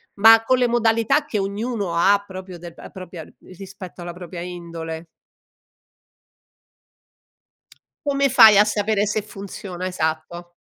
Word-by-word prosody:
Ma, 225 +2 +7
con 255 +3 +2
le 250 -1 +2
modalità 230 +4 +1
che 240 - -3
ognuno 200 -1 -3
ha 200 +4 +3
proprio 185 -2 -9
della 170 0 -11
propria 185 -2 -10
uhm, - - -17 0.2
rispetto 190 -1 -11
alla 175 0 -7
propria 175 0 -9
indole. 170 -2 -7 3.0
Come 280 -1 +1
fai 220 -5 +8
a 205 - +7
sapere 210 0 0
se 210 +1 -1
funziona? 195 -3 -8
Esatto. 170 0 -4
195 Hz, 125 wpm, -21 LUFS, 175-220 Hz, 3.0 s, fai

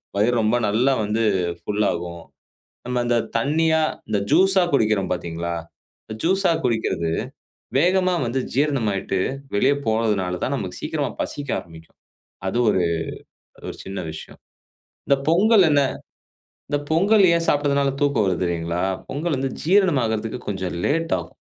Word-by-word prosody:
வயிறு 110 +5 +2
ரொம்ப 110 +2 +2
நல்லா 125 +6 +2
வந்து 110 +2 0 0.4
ஃபுல் 105 0 -1
ஆகும். 85 0 -5 0.6
நம்ம 125 0 -1
இந்த 120 0 +2 0.2
தண்ணியா, 160 +5 +2 0.3
இந்த 105 -2 +1
ஜூஸ்ஸா 190 0 +5
குடிக்கிறோம், 105 -7 +2
பார்த்தீங்களா? 85 -1 -4 0.5
இந்த 110 - -7
ஜூஸ்ஸா 190 +1 +2
குடிக்கிறது, 110 -8 0 0.7
வேகமா 185 +2 +3
வந்து 120 +3 -1 0.2
ஜீரணமாகிட்டு, 110 -10 0 0.4
வெளிய 135 +7 +4
போறதுனால 105 -5 0
தான் - - 0
நமக்கு - - -5
சீக்கிரமா - - -2
பசிக்க 145 -2 -6
ஆரம்பிக்கும். 80 -2 -15 0.5
அது 120 - -1
ஒரு 95 - +1 0.8
அது - - -13
ஒரு - - -13
சின்ன 95 0 -5
விஷயம். - - -10 0.7
இந்த 140 - +5
பொங்கல் 200 +4 +5
என்ன? 145 -1 +4 0.9
இந்த 145 - +1
பொங்கல் 200 +5 +4
ஏன் 165 0 0
சாப்பிட்டதுனால 140 -1 +2
தூக்கம் 140 -7 +2
வருது 90 -1 0
தெரியுங்களா? 85 0 -2 0.3
பொங்கல் 150 +2 -1
வந்து 135 0 -1
ஜீரணமாகுறதுக்கு 130 - +2
கொஞ்சம் 95 -3 -3
லேட் 165 +3 0
ஆகும். 85 - -10
120 Hz, 135 wpm, -22 LUFS, 95-150 Hz, 0.9 s, ஜூஸ்ஸா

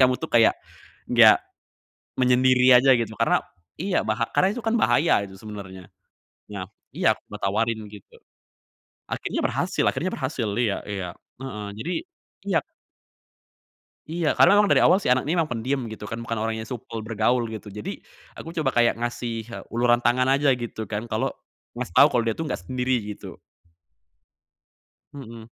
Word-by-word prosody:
kamu 130 -1 +5
tuh 160 - -4
kayak 115 -1 +5 0.5
enggak - - +7 0.8
menyendiri 125 0 +5
aja 135 0 +5
gitu, 110 -1 -3
karena - - +2 0.4
iya, 190 0 0
baha - - 0
karena 185 - +4
itu 245 - -6
kan 225 - +1
bahaya 155 -9 +3
itu 95 - -13
sebenernya. 95 -4 -9 0.7
Nah 95 -2 -5 0.3
iya, - - +3 0.2
gua - - -7
tawarin 110 +3 0
gitu. 105 -2 -15 0.9
Akhirnya - - -3
berhasil - - -1
akhirnya 185 +3 -2
berhasil, 130 -4 -3
iya 110 -5 0
iya, 95 -3 -4 0.3
heeh, 105 -6 -6
jadi 165 +11 -4 0.6
iyap. 165 -6 +2 1.5
Iya, 165 -2 0
karena 205 - +6
memang 210 - +5
dari - - +4
awal 185 - +5
si 200 - -7
anak 125 +1 +3
ini 160 +5 -1
memang 165 - +2
pendiem 125 +4 -1
gitu 110 0 -8
kan, 115 - -4
bukan 115 0 -4
orang 110 0 -2
yang 110 - -6
supel 115 -1 -7
bergaul 115 +2 +1
gitu. 110 -2 -8
Jadi 105 +1 -7 0.3
aku 165 - -9
coba 150 -4 +1
kayak 120 -1 +3
ngasih 120 -1 -3
he 120 - -8
uluran 120 +1 +2
tangan 120 +2 +2
aja 140 +1 +3
gitu 110 -3 -6
kan, 110 +2 -3
kalo 120 +4 -1 0.5
ngasih - - -5
tahu - - +8
kalo 120 - +1
dia 115 - +1
tuh 160 - -4
nggak - - -3
sendiri 130 -1 0 0.2
gitu. - - -11 1.7
Hmm. 115 -5 -10
120 Hz, 160 wpm, -24 LUFS, 110-135 Hz, 1.7 s, tahu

